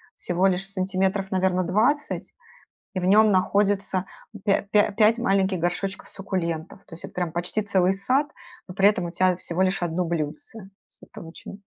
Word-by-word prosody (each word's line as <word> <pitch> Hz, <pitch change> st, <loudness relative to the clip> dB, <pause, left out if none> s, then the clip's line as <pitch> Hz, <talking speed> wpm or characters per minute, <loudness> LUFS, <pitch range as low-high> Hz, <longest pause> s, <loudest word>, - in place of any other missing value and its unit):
всего 180 Hz, +2 st, -1 dB
лишь 190 Hz, +1 st, -1 dB
сантиметров, 190 Hz, 0 st, -1 dB
наверно, 185 Hz, -1 st, +1 dB
20, 230 Hz, -, 0 dB, 0.6 s
и 185 Hz, -, -1 dB
в -, -, -4 dB
нём 210 Hz, +3 st, +5 dB
находится 195 Hz, 0 st, +1 dB, 0.4 s
пя 200 Hz, -2 st, +2 dB
пя 205 Hz, +1 st, +2 dB
пять 220 Hz, +3 st, +4 dB
маленьких 195 Hz, -4 st, +1 dB
горшочков 185 Hz, +3 st, -2 dB
суккулентов. 170 Hz, -4 st, -4 dB
То -, -, -11 dB
есть 165 Hz, -, -10 dB
это -, -, -8 dB
прям 175 Hz, -3 st, -2 dB
почти 175 Hz, +5 st, -1 dB
целый 190 Hz, -2 st, +2 dB
сад, 260 Hz, +9 st, +1 dB, 0.4 s
но 180 Hz, -, -9 dB
при 195 Hz, +1 st, +5 dB
этом 195 Hz, -4 st, 0 dB
у 170 Hz, -, -4 dB
тя 185 Hz, +1 st, +2 dB
всего 180 Hz, 0 st, -2 dB
лишь 190 Hz, 0 st, 0 dB
1 175 Hz, +1 st, -1 dB
блюдце. 160 Hz, +6 st, -4 dB
То 195 Hz, -, -12 dB, 0.2 s
есть -, -, -20 dB
это -, -, -12 dB
очень 175 Hz, +4 st, -11 dB
190 Hz, 180 wpm, -24 LUFS, 180-200 Hz, 0.6 s, нём